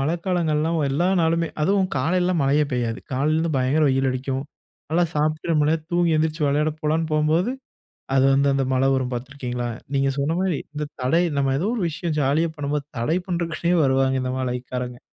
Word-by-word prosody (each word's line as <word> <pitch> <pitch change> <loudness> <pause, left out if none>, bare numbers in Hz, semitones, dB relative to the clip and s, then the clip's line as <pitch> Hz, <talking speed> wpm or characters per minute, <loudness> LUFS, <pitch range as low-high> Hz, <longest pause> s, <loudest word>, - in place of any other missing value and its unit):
மழைக்காலங்கள்லாம் 165 0 0
எல்லா 170 +6 +1
நாளுமே 165 0 +1
அதுவும் 190 +2 +2
காலையில 180 +7 +1
மழையே 145 +2 +3
பெய்யாது. 120 -1 -1
காலையிலேருந்து 155 +4 +1
பயங்கர 135 +5 +2
வெயில் 135 0 +2
அடிக்கும். 130 +1 -3 0.5
நல்லா 175 +2 +3
சாப்டு 155 +2 0
ரொம்ப 150 -1 +3
நேர 165 - +2
தூங்கி 175 -2 +2
எந்திரிச்சு 155 0 0
வெளையாட 150 +2 +2
போகலான்னு, 155 +2 0
போகும்போது, 155 +9 +2 0.6
அது 135 - +4
வந்து 140 +1 +3
அந்த 135 - +1
மழை 130 +1 +2
வரும் 130 -1 -1
பாத்திருக்கிறீங்களா? 125 -1 -4 0.3
நீங்க 135 0 +2
சொன்ன 150 +4 0
மாரி 185 -6 0
இந்த 150 0 -3
தடை, 165 +8 +2
நம்ப 135 -1 +1
ஏதோ 190 - 0
ஒரு 225 - -2
விஷயம் 155 0 -3
ஜாலியா 155 +5 +2
பண்ணும்போது 145 0 -2
தடை 155 +9 +1
பண்றதுக்கே 170 0 -1
வருவாங்க, 135 0 +2
இந்த 130 - -2
மழை 125 -1 -1
காரவங்க. 125 -1 -4
150 Hz, 170 wpm, -23 LUFS, 135-165 Hz, 0.6 s, அது